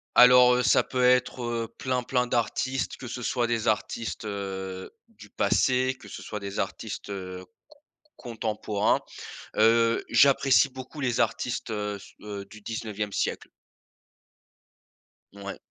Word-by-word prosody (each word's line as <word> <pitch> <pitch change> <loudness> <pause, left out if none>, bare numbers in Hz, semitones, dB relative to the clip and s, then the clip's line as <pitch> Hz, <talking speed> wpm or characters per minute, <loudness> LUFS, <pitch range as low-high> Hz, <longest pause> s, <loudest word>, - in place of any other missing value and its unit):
Alors, 125 0 +8
heu, 125 - +2
ça 125 - +4
peut 125 -1 -1
être, 125 0 +3
heu, 115 -1 -2
plein, 130 -1 -1
plein 125 0 0
d'artistes. 125 +3 -1
Que 130 - -8
ce 125 +1 -6
soit 120 0 0
des 115 -1 -1
artistes, 110 +1 -2
heu, 95 -2 -5 0.2
du - - -16
passé, 130 0 +2
que - - -13
ce - - -8
soit 105 - -6
des 100 -1 -5
artistes, - - -4
heu, 95 -2 -6
c 95 - -13
c - - -38 0.7
contemporains. 110 -3 -1 0.6
Heu, 115 +1 +4
j'apprécie 140 0 +5
beaucoup 130 +3 -10
les 125 -3 0
artistes, 120 -1 -1
heu, 105 -1 -2
s 100 - -13
heu, 100 -1 -7
du 110 +2 -14
19e 105 -1 -4
siècle. - - -2 1.9
Ouais. 100 0 -7
115 Hz, 145 wpm, -27 LUFS, 105-125 Hz, 1.9 s, Alors